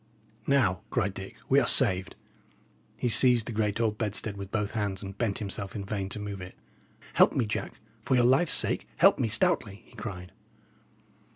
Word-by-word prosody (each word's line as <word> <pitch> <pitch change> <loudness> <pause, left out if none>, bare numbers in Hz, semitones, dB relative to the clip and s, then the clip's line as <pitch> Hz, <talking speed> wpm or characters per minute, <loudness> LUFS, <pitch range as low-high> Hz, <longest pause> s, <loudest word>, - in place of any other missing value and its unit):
"Now," 115 -11 +2
cried 100 -5 -1
Dick, 95 0 -9
"we 135 - +4
are 125 - 0
saved." 95 -7 +4 0.8
He - - -1
seized 120 0 +5
the - - -5
great 105 -1 -1
old 110 -2 0
bedstead 105 -1 -2
with 100 -1 -7
both 105 0 -2
hands, 100 -3 -3
and 95 0 -7
bent 105 -2 -1
himself 100 -1 -5
in 100 -2 -5
vain 95 -1 -4
to 105 - -4
move 100 -2 -6
it. 90 0 -10 0.6
"Help - - +5
me, 125 - 0
Jack. 105 - -4 0.3
For 130 - 0
your 125 - +4
life's 135 +7 +3
sake, - - -1
help - - +5
me - - +1
stoutly!" 105 -2 0
he - - -22
cried. 90 -4 -7
105 Hz, 185 wpm, -28 LUFS, 100-115 Hz, 0.8 s, seized